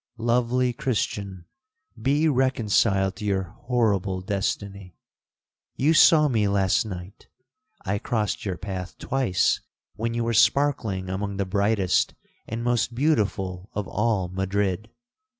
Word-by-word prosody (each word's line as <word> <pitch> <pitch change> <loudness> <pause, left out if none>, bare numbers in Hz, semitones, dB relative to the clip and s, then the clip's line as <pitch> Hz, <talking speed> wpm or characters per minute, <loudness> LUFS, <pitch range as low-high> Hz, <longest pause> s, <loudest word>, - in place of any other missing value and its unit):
'—'Lovely 120 +2 +1
Christian! 100 -7 -3 0.6
be 145 +6 +2
reconciled 110 -8 +2
to 105 - -6
your 95 -2 +1 0.2
horrible 100 -6 +1
destiny. 100 -1 -3 0.8
You 150 +5 +3
saw 155 -1 +6
me 110 -6 +1
last 100 +1 +2
night—I 100 - -8
crossed 110 -3 -2
your 95 -4 -3
path 95 0 -6
twice 125 -10 +1 0.3
when 115 +3 -3
you 120 - 0
were 115 0 -1
sparkling 110 -6 +2
among 100 +1 -3
the 100 - 0
brightest 100 -1 +1 0.3
and 115 +1 -4
most 120 -1 0
beautiful 100 - 0
of 105 -1 -3
all 105 -3 0
Madrid. 95 +2 -2
105 Hz, 115 wpm, -25 LUFS, 95-120 Hz, 0.8 s, saw